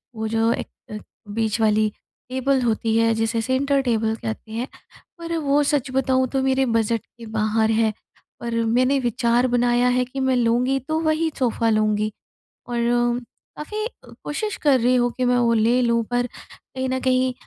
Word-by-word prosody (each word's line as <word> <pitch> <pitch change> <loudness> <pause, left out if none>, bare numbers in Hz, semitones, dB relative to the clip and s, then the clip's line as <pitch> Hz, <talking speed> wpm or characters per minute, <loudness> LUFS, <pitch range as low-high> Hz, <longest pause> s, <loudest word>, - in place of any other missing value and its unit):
वो 220 0 -3
जो 225 +1 +1
एक - - -4 0.2
एक 210 - -6 0.3
बीच 225 0 0
वाली 215 0 +3 0.4
टेबल 260 +1 +1
होती 225 -1 0
है 230 0 +3
जिसे 225 +1 0
सेंटर 275 +3 +1
टेबल 225 -2 0
कहते 115 - -6
हैं। 235 +4 -3 0.5
पर 335 0 -4
वो 290 -1 +2
सच 280 -2 0
बताऊँ 260 0 +1
तो 270 -1 0
मेरे 265 0 +2
बजट 230 -1 +1
के 235 -1 -14
बाहर 220 +1 +2
है। 220 0 +2 0.5
पर 235 -1 -4
मैंने 255 +4 +2
विचार 240 0 +1
बनाया 245 0 +2
है 250 - +2
कि 270 +2 -7
मैं 265 -1 +2
लूँगी 245 +3 +2
तो 315 0 +1
वही 320 +1 +1
सोफा 230 -2 +1
लूँगी 215 0 +1 0.6
और 240 0 +1 0.4
काफ़ी 425 +8 -4 0.4
कोशिश 420 +8 -3
कर 275 -4 +4
रही 250 +2 +3
हूँ 245 -1 +2
कि 255 - +1
मैं 245 0 +3
वो 235 -1 +3
ले 230 +3 +3
लूँ 235 -1 +2
पर 245 0 +1
कहीं 260 +1 -8
न 260 0 -1
कहीं 255 0 +2
245 Hz, 175 wpm, -22 LUFS, 225-260 Hz, 0.6 s, कर